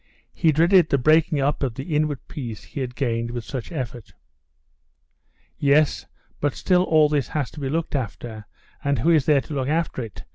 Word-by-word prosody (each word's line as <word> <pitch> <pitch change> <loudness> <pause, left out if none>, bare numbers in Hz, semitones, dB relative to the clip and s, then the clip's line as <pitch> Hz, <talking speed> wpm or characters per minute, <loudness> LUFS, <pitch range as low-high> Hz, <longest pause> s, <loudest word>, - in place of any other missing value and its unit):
He 160 - +3
dreaded 170 +3 +4
the 140 - +3
breaking 155 +2 +3
up 145 +2 0
of 130 -5 -1
the 135 +5 -5
inward 150 -2 -1
peace 120 -8 -7
he - - -8
had 125 -2 -4
gained 115 -4 -1
with 120 -1 -5
such 120 +1 -6
effort. 125 -7 -6 1.5
"Yes, 145 +1 +2 0.3
but 145 -1 0
still 180 -1 +2
all 155 -3 +5
this 145 -2 0
has 145 -4 -3
to - - -10
be 135 -2 -3
looked 160 +1 -2
after, 110 -3 -5 0.4
and 140 -1 +1
who 140 +10 +2
is 155 -5 +3
there 145 -3 +4
to 150 - -9
look 135 -2 -1
after 160 -4 -1
it?" 110 -4 -8
140 Hz, 190 wpm, -23 LUFS, 125-155 Hz, 1.5 s, all